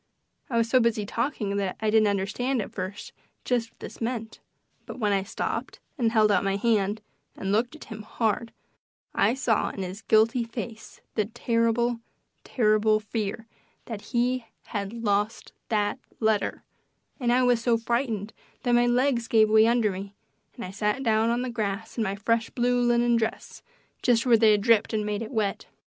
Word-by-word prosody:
I 235 - 0
was 230 0 +2
so 255 +2 +4
busy 230 -3 +1
talking 210 -3 -2
that 195 -2 -2
I 220 -1 0
didn't 220 -1 +5
understand 210 +6 -1
at 205 - -4
first 190 +3 -6 0.3
just 240 -2 0
what - - -34
this - - -9
meant, 225 -1 -3 0.5
but - - -7
when 210 -4 +1
I 195 - +2
stopped 195 +3 -4 0.2
and 235 -6 +1
held 215 -2 +4
out 200 -2 +3
my 195 0 0
hand 210 -1 +1 0.3
and 195 - -3
looked 235 +7 +1
at 310 - -11
him 220 -1 -8
hard 220 +1 -1 0.6
I 240 - +2
saw 250 -5 +1
in 195 - -5
his 185 +3 -6
guilty 225 +3 +3
face 230 -1 -8
the 215 - +1
terrible, 230 +1 0 0.4
terrible 215 -2 +2
fear 215 +1 -4 0.4
that 220 -4 -6
he 250 0 0 0.3
had 200 -2 -2
lost 215 -1 -1 0.2
that 205 -2 0 0.2
letter; 220 -2 0 0.6
and 240 -3 +1
I 255 +1 +4
was 245 -2 +3
so 230 -1 +2
frightened 230 -3 -2 0.3
that 245 - +1
my 240 0 +4
legs 245 -1 +2
gave 220 -1 +4
way 220 0 +6
under 230 -3 +2
me, 195 +2 -7 0.4
and 235 - -6
I 185 - -7
sat 210 +6 -1
down 225 -1 +2
on 240 +1 0
the 255 - -3
grass 220 -1 -3
in 230 - 0
my 195 -2 -1
fresh 225 +3 0
blue 245 0 +1
linen 240 0 +3
dress, 220 -1 -3 0.4
just 240 -1 +3
where 240 -2 +6
they 220 -1 +5
had 205 - +2
dripped 225 0 +3
and 215 -1 0
made 210 0 -2
it 225 - -5
wet. 215 -6 -2
225 Hz, 185 wpm, -26 LUFS, 210-240 Hz, 0.6 s, way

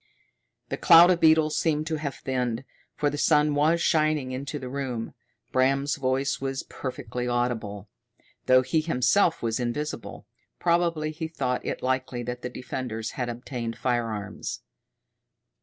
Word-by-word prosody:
The - - -2
cloud 170 +1 +8
of 175 - +2
beetles 160 -1 +4
seemed 155 -2 +1
to 160 -1 -2
have 145 -2 -4
thinned, 125 -2 -2 0.3
for 145 -1 0
the 145 - -4
sun 150 -1 +4
was 155 +4 +3
shining 155 -4 +2
into 140 +3 -4
the 130 -3 -6
room. 125 -4 -4 0.4
Bram's 135 +3 +2
voice 135 0 0
was 135 0 -2
perfectly 125 -2 -5
audible, 115 -5 -2 0.6
though 130 0 +6
he 155 +5 +1
himself 165 +3 +2
was 115 0 0
invisible; 125 +2 -4 0.3
probably 170 -3 +1
he 160 +1 -4
thought 125 -6 -2
it - - -4
likely 130 -1 -1
that 125 +1 -5
the 125 - -4
defenders 120 -3 -5
had 125 -1 -3
obtained 120 -1 -5
firearms. 115 -5 -2
130 Hz, 140 wpm, -26 LUFS, 125-155 Hz, 0.6 s, cloud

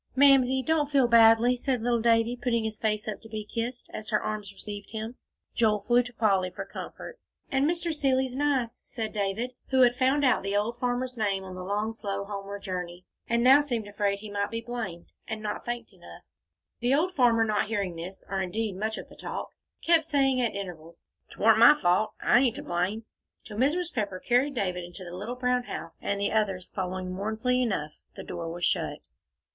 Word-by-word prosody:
"Mamsie, 265 -1 +5
don't 310 -2 +1
feel 275 -4 +4
badly," 230 +1 +6
said 250 -1 -1
little 240 -1 +1
Davie, 230 +1 +3
putting 240 -2 0
up 220 - 0
his 215 - -13
face 215 -1 0
to 215 +1 -6
be 215 -1 -5
kissed, 235 +3 -4
as 215 - -5
her 210 -1 +2
arms 210 -2 -4
received 205 +1 -8
him. 220 +2 -5 0.4
Joel 215 -3 +2
flew 240 +4 +4
to 245 0 -8
Polly 195 -5 +2
for - - -7
comfort. 475 - -8 0.3
"And 275 +2 +2
Mr. 340 -1 -1
Seeley's 265 -3 +1
nice," 270 -5 0
said 225 -4 -5
David, 210 +4 -1 0.2
who 265 -1 +3
had 245 -1 +5
found 270 +3 +2
out 250 -3 +3
the 195 +1 -1
old 230 +4 -1
farmer's 250 0 -2
name 195 -3 0
on 190 -1 -8
the 185 0 -6
long, 210 +4 -1
slow, 200 -3 -4
homeward 200 0 -6
journey, 180 -1 -5 0.2
and 235 +1 +2
now 270 +3 +8
seemed 240 -7 -3
afraid 205 -1 0
he 215 -1 -8
might 200 0 -1
be 230 - -3
blamed, 230 -8 -5 0.2
and 220 -1 -4
not 215 -1 -4
thanked 240 0 -5
enough. - - -14 0.6
The 245 +2 +2
old 355 +5 +1
farmer, 240 -6 +4
not 215 -1 0
hearing 200 -5 -2
this, 180 +3 -8
or 195 0 -2
indeed 200 +1 -2
much 220 +3 -2
of - - -7
the - - -15
talk, - - -5 0.3
kept 330 -2 +4
saying 270 -4 +2
at 235 - 0
intervals, 170 -4 -8 0.3
"'Twarn't - - +4
my 300 - +9
fault. 200 -2 +1
I 245 - +4
ain't 250 -3 +2
to - - -5
blame," 185 +6 -2 0.4
till 210 - -8
Mrs. 320 +8 +1
Pepper 200 -5 -2
carried 255 +6 +1
David 180 -5 -1
into 175 +2 -9
the 175 0 -8
little 210 +7 -5
brown 250 0 0
house, - - -7
and 200 - -1
the 200 - 0
others, 195 -4 0
following 185 0 -3
mournfully 220 +6 0
enough, 190 -11 -1 0.2
the - - -7
door 165 -1 -5
was 175 +1 -2
shut. - - 0
225 Hz, 205 wpm, -28 LUFS, 200-250 Hz, 0.6 s, my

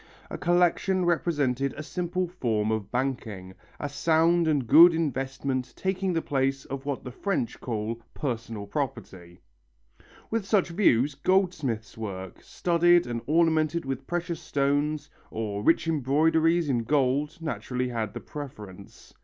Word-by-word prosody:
A - - -4
collection 180 +2 +2
represented 145 -6 0
a 155 - -5
simple 180 +2 -2
form 110 - -1
of 110 -3 -3
banking, 115 -8 -3 0.3
a 145 - -2
sound 165 +3 +2
and 145 -5 +1
good 165 +8 +8
investment 135 -3 -2
taking 190 0 -1
the 165 -2 -1
place 135 0 -1
of 135 +1 -6
what 140 -2 -3
the 125 - -7
French 150 - -2
call 115 0 -3
"personal 115 -6 -4
property." 100 - -5 0.9
With 225 -1 0
such 195 -4 +2
views, 145 - +3
goldsmiths' 150 - 0
work, 95 -4 -6
studded 175 0 +3
and 120 -1 -4
ornamented 160 0 +2
with 135 0 -4
precious 175 -1 -3
stones, 145 +1 0 0.2
or 105 -2 -3
rich 165 +3 +3
embroideries 160 +3 +2
in 130 -4 +1
gold, 140 +3 +1
naturally 125 -5 -3
had 110 -4 -3
the - - -5
preference. 105 -10 -10
140 Hz, 135 wpm, -27 LUFS, 120-165 Hz, 0.9 s, good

